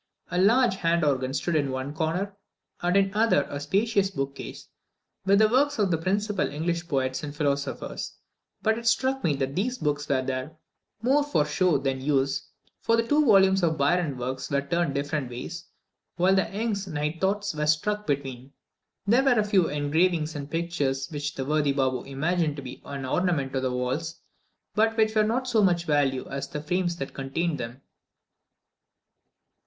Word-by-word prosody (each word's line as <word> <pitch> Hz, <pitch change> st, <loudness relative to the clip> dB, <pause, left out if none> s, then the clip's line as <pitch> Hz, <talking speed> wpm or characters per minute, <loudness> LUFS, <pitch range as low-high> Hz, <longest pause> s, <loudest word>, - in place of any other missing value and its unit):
A 180 Hz, -, 0 dB
large 225 Hz, 0 st, +4 dB
hand 170 Hz, -2 st, +1 dB
organ 130 Hz, -2 st, +1 dB
stood 150 Hz, +5 st, -1 dB
in 145 Hz, -3 st, +1 dB
one 130 Hz, +2 st, -3 dB
corner, 175 Hz, +5 st, -2 dB, 0.5 s
and 180 Hz, +2 st, +2 dB
in 195 Hz, -1 st, +3 dB
the 205 Hz, -, -6 dB
other 225 Hz, -10 st, +4 dB
a 145 Hz, -, -3 dB
spacious 200 Hz, +5 st, +1 dB
bookcase, 135 Hz, -6 st, -5 dB, 0.6 s
with 200 Hz, +1 st, +5 dB
the 215 Hz, +1 st, +6 dB
works 280 Hz, +5 st, +2 dB
of 200 Hz, -4 st, +2 dB
the 165 Hz, -, +2 dB
principal 200 Hz, +3 st, 0 dB
English 170 Hz, +3 st, -2 dB
poets 130 Hz, -3 st, -1 dB
and 145 Hz, -1 st, -6 dB
philosophers; 140 Hz, -2 st, -2 dB, 0.5 s
but 220 Hz, +1 st, +2 dB
it 235 Hz, -, -5 dB
struck 260 Hz, +4 st, +2 dB
me 155 Hz, -4 st, +2 dB
that 135 Hz, 0 st, -2 dB
these 245 Hz, -, -1 dB
books 145 Hz, -6 st, -2 dB
were 130 Hz, -2 st, +2 dB
there 130 Hz, +4 st, -4 dB, 0.5 s
more 275 Hz, +4 st, +4 dB
for 285 Hz, -, +1 dB
show 165 Hz, +1 st, +2 dB
than 135 Hz, -1 st, -2 dB
use, 135 Hz, -1 st, 0 dB, 0.3 s
for 230 Hz, -, +2 dB
the 230 Hz, 0 st, +1 dB
two 300 Hz, +3 st, +4 dB
volumes 195 Hz, -5 st, +5 dB
of 160 Hz, -2 st, +1 dB
Byron's 145 Hz, -1 st, +1 dB
works 130 Hz, +2 st, -4 dB
were 140 Hz, 0 st, +1 dB
turned 165 Hz, 0 st, 0 dB
different 145 Hz, -1 st, -2 dB
ways, 120 Hz, 0 st, -7 dB, 0.5 s
while 185 Hz, +3 st, +3 dB
Young's 200 Hz, +1 st, -1 dB
Night 150 Hz, 0 st, -3 dB
Thoughts 200 Hz, 0 st, 0 dB
were 150 Hz, 0 st, -1 dB
stuck 210 Hz, +8 st, +1 dB
between. 135 Hz, -2 st, -3 dB, 0.5 s
There 235 Hz, +6 st, +4 dB
were 260 Hz, -4 st, +4 dB
a -, -, +3 dB
few 200 Hz, -5 st, +3 dB
engravings 155 Hz, +2 st, +1 dB
and 140 Hz, -1 st, -5 dB
pictures, 145 Hz, -5 st, -1 dB
which 145 Hz, -1 st, -4 dB
the 135 Hz, -, -3 dB
worthy 150 Hz, -1 st, +1 dB
Baboo 130 Hz, -2 st, 0 dB
imagined 155 Hz, +3 st, 0 dB
to 140 Hz, -, -7 dB
be 125 Hz, -1 st, -9 dB
an 140 Hz, -1 st, -5 dB
ornament 140 Hz, -2 st, 0 dB
to 135 Hz, -, 0 dB
the 130 Hz, -, 0 dB
walls, 130 Hz, +6 st, -2 dB, 0.5 s
but 225 Hz, +3 st, +2 dB
which 220 Hz, -1 st, +3 dB
were 215 Hz, -, +4 dB
not 230 Hz, +5 st, +1 dB
of -, -, -9 dB
so 225 Hz, -3 st, +3 dB
much 175 Hz, -3 st, +2 dB
value 140 Hz, -4 st, +1 dB
as 140 Hz, 0 st, -4 dB
the 150 Hz, -, -5 dB
frames 175 Hz, +2 st, 0 dB
that 135 Hz, -5 st, -6 dB
contained 150 Hz, +4 st, -2 dB
them. 120 Hz, +3 st, -7 dB
160 Hz, 180 wpm, -26 LUFS, 140-195 Hz, 0.6 s, the